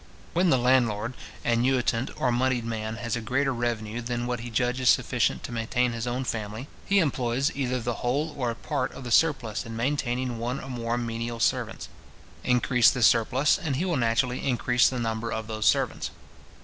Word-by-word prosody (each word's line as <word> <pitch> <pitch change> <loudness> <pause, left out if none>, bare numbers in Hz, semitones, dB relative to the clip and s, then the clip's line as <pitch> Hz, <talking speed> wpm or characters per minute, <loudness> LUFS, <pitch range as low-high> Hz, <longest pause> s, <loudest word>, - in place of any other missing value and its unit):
When 180 +1 +3
the 130 - +5
landlord, 120 -2 +2 0.3
annuitant, 120 0 +1
or 125 - +2
monied 125 -1 +1
man, 110 -1 -3
has 115 +2 -3
a 120 - -3
greater 135 +4 0
revenue 120 -1 -2
than 120 0 -3
what 125 -1 -2
he 120 +1 -6
judges 125 +2 +1
sufficient 125 -2 +2
to - - -6
maintain 120 +2 0
his 115 0 -4
own 125 +2 -1
family, 110 +1 -4 0.2
he 200 - +3
employs 135 -5 +1
either 130 -2 -1
the 120 +1 -2
whole 145 +6 0
or 125 -3 -1
a 115 - -3
part 145 +4 -2
of - - -9
the 120 - -6
surplus 130 -7 +2
in 115 0 -7
maintaining 125 -1 -1
one 125 +4 -2
or 135 - -8
more 120 -1 -2
menial 115 0 -3
servants. 115 - -1 0.6
Increase 125 -1 +4
this 125 -3 +2
surplus, 130 - +3
and 155 -7 -2
he 165 +8 -1
will 175 -3 0
naturally 125 0 +1
increase 125 -1 +3
the 130 - -4
number 115 0 -2
of 110 0 -3
those 110 0 -2
servants. - - +1
120 Hz, 190 wpm, -26 LUFS, 115-130 Hz, 0.6 s, the